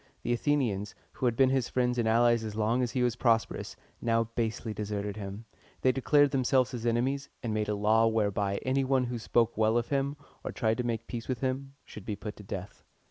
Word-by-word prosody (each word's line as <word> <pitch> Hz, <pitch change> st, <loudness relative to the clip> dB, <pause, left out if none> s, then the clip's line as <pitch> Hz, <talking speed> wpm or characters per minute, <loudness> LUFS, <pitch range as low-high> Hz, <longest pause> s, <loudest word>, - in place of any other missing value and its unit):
The -, -, +1 dB
Athenians, 115 Hz, -7 st, 0 dB, 0.2 s
who 130 Hz, -, -1 dB
had 120 Hz, -, +1 dB
been 130 Hz, +1 st, +4 dB
his 130 Hz, -3 st, +1 dB
friends 125 Hz, -1 st, +1 dB
and 115 Hz, -, +1 dB
allies 120 Hz, 0 st, +4 dB
as 110 Hz, -1 st, -5 dB
long 110 Hz, +3 st, +1 dB
as 120 Hz, -2 st, -1 dB
he 125 Hz, -, +1 dB
was 120 Hz, -2 st, +1 dB
prosperous, 115 Hz, -2 st, 0 dB, 0.3 s
now 115 Hz, -1 st, +2 dB
basely 110 Hz, -1 st, -2 dB
deserted 105 Hz, -1 st, -3 dB
him. 100 Hz, +1 st, -7 dB, 0.4 s
They 130 Hz, -, +4 dB
declared 145 Hz, +2 st, +3 dB
themselves 130 Hz, -1 st, +2 dB
his 120 Hz, -2 st, -3 dB
enemies, 130 Hz, +4 st, 0 dB
and 115 Hz, -3 st, -1 dB
made 105 Hz, -1 st, -1 dB
a 105 Hz, -, +1 dB
law 110 Hz, +2 st, +4 dB
whereby 100 Hz, -3 st, 0 dB
any 135 Hz, +1 st, +1 dB
one 130 Hz, -1 st, +2 dB
who 120 Hz, -1 st, -3 dB
spoke 115 Hz, 0 st, +1 dB
well 110 Hz, +1 st, +3 dB
of 120 Hz, -, -1 dB
him, 140 Hz, +1 st, 0 dB, 0.3 s
or -, -, -4 dB
tried 110 Hz, -3 st, 0 dB
to 125 Hz, -, -1 dB
make 115 Hz, -2 st, -2 dB
peace 120 Hz, -2 st, -6 dB
with 125 Hz, -3 st, -2 dB
him, 135 Hz, +1 st, -2 dB
should 105 Hz, -, -11 dB
be 105 Hz, -, -2 dB
put 105 Hz, +1 st, -7 dB
to 105 Hz, -, -10 dB
death. 100 Hz, 0 st, -7 dB
115 Hz, 220 wpm, -29 LUFS, 110-130 Hz, 0.4 s, been